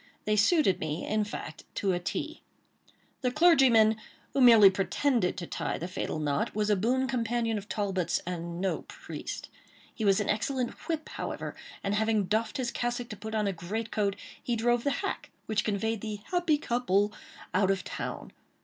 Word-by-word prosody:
They 215 Hz, -, +2 dB
suited 210 Hz, -, +4 dB
me, 155 Hz, +1 st, -3 dB
in 215 Hz, 0 st, +1 dB
fact, 180 Hz, -6 st, -7 dB
to 195 Hz, -, +1 dB
a 175 Hz, -, 0 dB
T. 310 Hz, -, -4 dB, 0.8 s
The 255 Hz, -, +2 dB
clergyman, 255 Hz, -8 st, +5 dB, 0.4 s
who 275 Hz, -, +2 dB
merely 225 Hz, -6 st, +9 dB
pretended 200 Hz, +2 st, +1 dB
to 175 Hz, -, -4 dB
tie -, -, -3 dB
the 175 Hz, -, -4 dB
fatal 185 Hz, -, -3 dB
knot, 145 Hz, +1 st, -1 dB
was 210 Hz, 0 st, +1 dB
a -, -, +5 dB
boon 250 Hz, +7 st, +1 dB
companion 230 Hz, -3 st, 0 dB
of 205 Hz, -, -13 dB
Talbot's, 190 Hz, -5 st, 0 dB
and 170 Hz, -1 st, -4 dB
no 190 Hz, 0 st, 0 dB
priest. -, -, -7 dB, 0.5 s
He 220 Hz, -, -5 dB
was 195 Hz, -1 st, +4 dB
an 210 Hz, -, -1 dB
excellent 245 Hz, +4 st, 0 dB, 0.2 s
"whip," 320 Hz, -2 st, -2 dB
however; -, -, -5 dB, 0.3 s
and 200 Hz, -, 0 dB
having 220 Hz, 0 st, +2 dB
doffed 220 Hz, +7 st, 0 dB
his 250 Hz, -3 st, -1 dB
cassock 240 Hz, 0 st, -2 dB
to 215 Hz, -, -5 dB
put 220 Hz, +2 st, -6 dB
on 215 Hz, -1 st, +1 dB
a 200 Hz, -, 0 dB
great 210 Hz, +6 st, -4 dB
coat, 200 Hz, -2 st, 0 dB, 0.3 s
he 240 Hz, -, -1 dB
drove 240 Hz, +1 st, +2 dB
the 285 Hz, -, +2 dB, 0.2 s
hack -, -, -4 dB, 0.2 s
which 215 Hz, -1 st, 0 dB
conveyed 220 Hz, +1 st, -1 dB
the 215 Hz, -2 st, -5 dB
"happy 350 Hz, -4 st, +3 dB
couple" 210 Hz, -7 st, +1 dB, 0.4 s
out 190 Hz, +1 st, +3 dB
of 195 Hz, -1 st, +1 dB
town. -, -, -5 dB
215 Hz, 180 wpm, -29 LUFS, 195-240 Hz, 0.8 s, merely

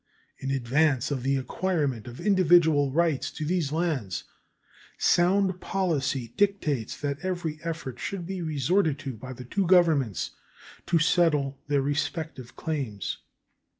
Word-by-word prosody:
In 135 Hz, -, -4 dB
advance 135 Hz, +1 st, +1 dB
of 135 Hz, -3 st, -1 dB
the 135 Hz, +2 st, +1 dB
acquirement 135 Hz, -, -1 dB
of 120 Hz, 0 st, -9 dB
individual 170 Hz, -7 st, +4 dB
rights 160 Hz, -2 st, +1 dB
to 155 Hz, -, -4 dB
these 165 Hz, -3 st, 0 dB
lands, 155 Hz, -, -1 dB, 0.7 s
sound 185 Hz, +1 st, +3 dB
policy 145 Hz, -10 st, -1 dB
dictates 160 Hz, -, 0 dB
that 140 Hz, -1 st, -2 dB
every 175 Hz, -3 st, -3 dB
effort 155 Hz, -7 st, -5 dB
should 190 Hz, -4 st, -4 dB
be 190 Hz, 0 st, -4 dB
resorted 155 Hz, +1 st, +1 dB
to 140 Hz, -2 st, -5 dB
by 130 Hz, +4 st, -8 dB
the 125 Hz, 0 st, -9 dB
two 195 Hz, +8 st, -1 dB
Governments 150 Hz, -, +3 dB, 0.6 s
to 170 Hz, -, +3 dB
settle 150 Hz, -5 st, +2 dB
their 140 Hz, -1 st, +2 dB
respective 145 Hz, -2 st, -3 dB
claims. 135 Hz, -, -3 dB
150 Hz, 130 wpm, -27 LUFS, 135-175 Hz, 0.7 s, individual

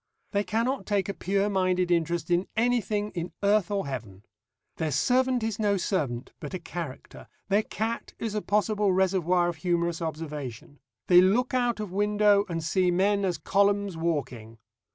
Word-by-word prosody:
They 200 Hz, -1 st, +1 dB
cannot 235 Hz, +6 st, -1 dB
take 200 Hz, -1 st, 0 dB
a -, -, -1 dB
pure 195 Hz, +1 st, 0 dB
minded 185 Hz, -2 st, +1 dB
interest 170 Hz, 0 st, 0 dB
in 175 Hz, +2 st, +2 dB
anything 220 Hz, -3 st, +1 dB
in 175 Hz, 0 st, -5 dB
earth 200 Hz, -2 st, +3 dB
or 200 Hz, -4 st, -1 dB
heaven. 110 Hz, -8 st, -7 dB, 0.5 s
Their 160 Hz, -, -1 dB
servant 250 Hz, -, +2 dB
is 220 Hz, 0 st, -2 dB
no 205 Hz, -2 st, +2 dB
servant, 145 Hz, -, -2 dB
but -, -, -6 dB
a -, -, -4 dB
character; 165 Hz, -5 st, -8 dB, 0.2 s
their 200 Hz, +2 st, +4 dB
cat 225 Hz, +2 st, -4 dB
is 225 Hz, -2 st, -4 dB
a 210 Hz, -, -1 dB
possible 210 Hz, -1 st, +1 dB
reservoir 180 Hz, -2 st, +2 dB
of 175 Hz, -2 st, -3 dB
humorous 170 Hz, 0 st, -1 dB
observation; 150 Hz, -5 st, -6 dB, 0.3 s
they 180 Hz, 0 st, +7 dB
look 225 Hz, +8 st, +2 dB
out 245 Hz, -3 st, +1 dB
of 210 Hz, -4 st, -5 dB
window 205 Hz, +1 st, +3 dB
and 165 Hz, -1 st, -3 dB
see 180 Hz, +3 st, +2 dB
men 200 Hz, +3 st, +2 dB
as 180 Hz, -3 st, 0 dB
columns 200 Hz, -1 st, +1 dB
walking. 135 Hz, -9 st, -3 dB
190 Hz, 165 wpm, -27 LUFS, 170-210 Hz, 0.5 s, they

